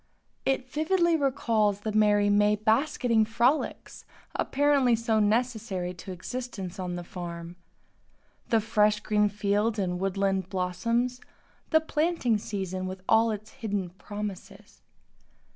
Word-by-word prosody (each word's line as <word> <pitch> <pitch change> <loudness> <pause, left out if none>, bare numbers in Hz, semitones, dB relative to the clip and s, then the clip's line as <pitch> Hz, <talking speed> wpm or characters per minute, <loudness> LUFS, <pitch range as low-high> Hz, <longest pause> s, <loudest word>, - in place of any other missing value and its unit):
It 265 -1 0
vividly 335 +4 +2
recalls 225 -8 +1
the 215 - -2
merry 210 -1 +4
May 205 +1 +4
basketing 230 +1 +2
frolics, 235 +6 0 0.3
apparently 275 -3 +3
so 225 -1 +1
necessary 215 -4 0
to 180 +2 -9
existence 195 -1 -6
on 180 -1 -3
the 175 - -5
farm; 170 -1 -7 0.9
the 225 -1 +3
fresh 210 -1 +2
green 210 -1 +2
fields 210 +2 0
and 180 -3 -1
woodland 195 -1 0
blossoms; 230 +8 -1 0.5
the 315 -1 +4
planting 310 -8 0
season 190 -3 -4
with 185 0 -7
all 225 +1 +4
its 215 0 -5
hidden 205 -8 -3
promises. 205 +1 -8
210 Hz, 120 wpm, -27 LUFS, 195-240 Hz, 0.9 s, merry